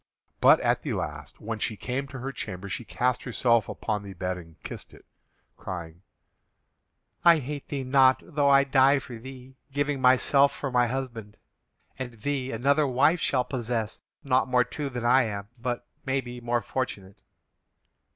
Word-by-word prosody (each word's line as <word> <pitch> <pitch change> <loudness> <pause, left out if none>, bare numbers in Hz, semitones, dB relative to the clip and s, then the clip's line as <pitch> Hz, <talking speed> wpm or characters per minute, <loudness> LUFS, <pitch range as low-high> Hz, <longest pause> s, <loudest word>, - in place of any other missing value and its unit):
But - - +7
at - - +1
the - - -3
last, - - -5
when 110 0 -5
she 110 - -2
came 130 +5 -3
to 135 -1 -8
her 130 +2 -4
chamber, 100 -6 -6
she 120 - -4
cast 125 +2 0
herself 115 -2 +1
upon 105 -2 -2
the 100 -2 -9
bed 90 +1 -2
and 85 -3 -12
kissed - - -9
it, - - -19 0.5
crying: 85 -2 -7 1.2
"I 170 -1 +7
hate 145 0 -5
thee 140 -2 -3
not, 130 0 +5
though 145 -3 +1
I 140 0 +6
die 135 +1 +4
for 125 -3 -7
thee, 130 +2 -11
giving 145 0 -1
myself 135 +2 +4
for 135 - -4
my 125 -1 +3
husband. 120 -5 -5 0.6
And 125 -2 -5
thee 130 +3 -3
another 140 +6 +2
wife 145 +7 +3
shall 125 -4 +1
possess, 120 -4 -3 0.2
not 130 -1 +2
more 125 -1 +4
true 145 +2 -5
than 120 -2 -4
I 125 +1 +5
am, 100 -1 -5
but, 120 0 -3 0.2
maybe, 130 -2 -3
more 120 0 0
fortunate!" 100 -7 -5
125 Hz, 165 wpm, -27 LUFS, 115-135 Hz, 1.2 s, But